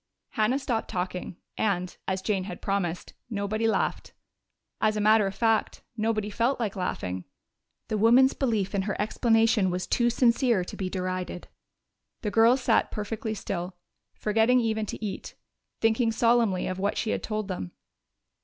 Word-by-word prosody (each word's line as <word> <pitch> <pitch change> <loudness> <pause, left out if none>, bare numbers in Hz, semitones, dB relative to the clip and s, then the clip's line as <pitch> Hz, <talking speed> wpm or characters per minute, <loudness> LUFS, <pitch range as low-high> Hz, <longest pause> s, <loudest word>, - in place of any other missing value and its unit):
Hannah 220 +3 +1
stopped 245 -5 -2
talking, 180 -2 -4 0.2
and, 185 -4 0
as 190 0 -2
Jane 195 -3 0
had 180 -3 -7
promised, 185 -3 -2 0.2
nobody 215 +1 -1
laughed. 220 - -1 0.7
As 215 0 +2
a - - 0
matter 215 0 +4
of 195 - -5
fact, 225 -2 +1
nobody 215 -1 -1
felt 235 +6 +1
like 215 -5 -2
laughing. 95 - -3 0.6
The 215 -2 -1
woman's 245 +5 +6
belief 220 -8 -1
in 200 - +1
her - - -3
explanation 225 -1 +2
was 180 0 -2
too 240 -1 +2
sincere 240 -3 +3
to - - -8
be 185 -1 -3
derided. 185 -1 -4 0.7
The 210 - -1
girls 230 +4 +5
sat 235 -2 +2
perfectly 220 +2 -4
still, 180 -3 -4 0.4
forgetting 225 +4 +3
even 220 -2 -1
to 220 - -5
eat, 200 - -6 0.5
thinking 225 +1 +3
solemnly 230 -4 +2
of 185 0 -3
what 200 +2 0
she 220 - -1
had - - -1
told 215 -2 -3
them. 180 - -5
215 Hz, 155 wpm, -27 LUFS, 190-225 Hz, 0.7 s, woman's